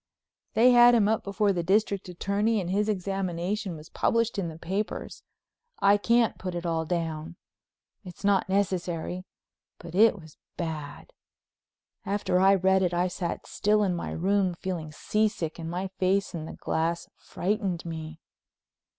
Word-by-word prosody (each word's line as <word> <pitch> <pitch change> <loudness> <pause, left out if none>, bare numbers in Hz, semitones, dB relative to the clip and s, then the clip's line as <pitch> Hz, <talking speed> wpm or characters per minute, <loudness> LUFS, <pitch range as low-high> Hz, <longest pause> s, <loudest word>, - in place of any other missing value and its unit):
They 245 +3 +6
had 240 0 +7
him 210 -3 +4
up 220 0 +1
before 200 0 +1
the 175 - -1
District 200 +1 +1
Attorney 205 +5 0
and 180 -2 -3
his 210 +2 +1
examination 195 0 -2
was 155 0 -12
published 230 -2 +1
in 180 - -1
the 160 -1 -7
papers. 190 +6 -4 0.6
I 200 +1 +5
can't 235 +2 +2
put 185 -1 -4
it 175 0 -4
all 165 -1 0
down—it's 170 +3 -7
not 200 -1 +2
necessary—but 180 -2 -4
it 210 +2 +5
was 155 -3 -15 0.2
bad. 155 -4 -6 0.9
After 195 -2 0
I 195 +1 +6
read 190 0 +3
it 180 -2 +1
I 175 +1 +2
sat 180 -1 -4
still 210 +1 +1
in 190 -3 +1
my 170 - -4
room, 190 +1 +1
feeling 170 -4 -4
seasick 205 -1 -1
and 165 0 -5
my 180 +3 -3
face 195 +1 +1
in 160 -2 -5
the - - -8
glass 165 +1 -2
frightened 190 -3 -2
me. 160 -1 -6
185 Hz, 150 wpm, -27 LUFS, 170-205 Hz, 0.9 s, had